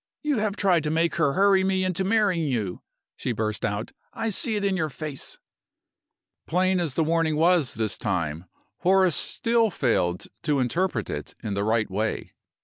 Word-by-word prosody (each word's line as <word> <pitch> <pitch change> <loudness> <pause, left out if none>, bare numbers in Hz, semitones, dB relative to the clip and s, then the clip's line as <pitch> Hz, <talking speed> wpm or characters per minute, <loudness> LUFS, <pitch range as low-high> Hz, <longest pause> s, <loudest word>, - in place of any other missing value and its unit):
"You 295 -5 +1
have 210 -1 -1
tried 180 -6 +2
to - - 0
make 165 +2 +1
her 145 -4 +2
hurry 195 +1 +4
me 190 0 +1
into 185 0 0
marrying 195 -5 +2
you," 110 -9 -2 0.3
she 125 - -2
burst 110 -1 -2
out. 105 +2 -2 0.2
"I 225 - -1
see 220 +2 +3
it 205 -1 -1
in 195 -1 +1
your 160 -4 -1
face!" 150 0 -6 1.1
Plain 185 +2 +2
as 160 -7 -1
the 165 - +2
warning 160 -1 +1
was 165 -3 +3
this 110 -2 -2
time, 85 -4 -2 0.3
Horace 185 -3 +4
still 230 - +1
failed 115 - 0 0.2
to 150 -2 +1
interpret 130 - -1
it - - -6
in 105 - -3
the 100 0 -1
right 110 0 +1
way. 110 +3 -2
165 Hz, 175 wpm, -25 LUFS, 115-190 Hz, 1.1 s, hurry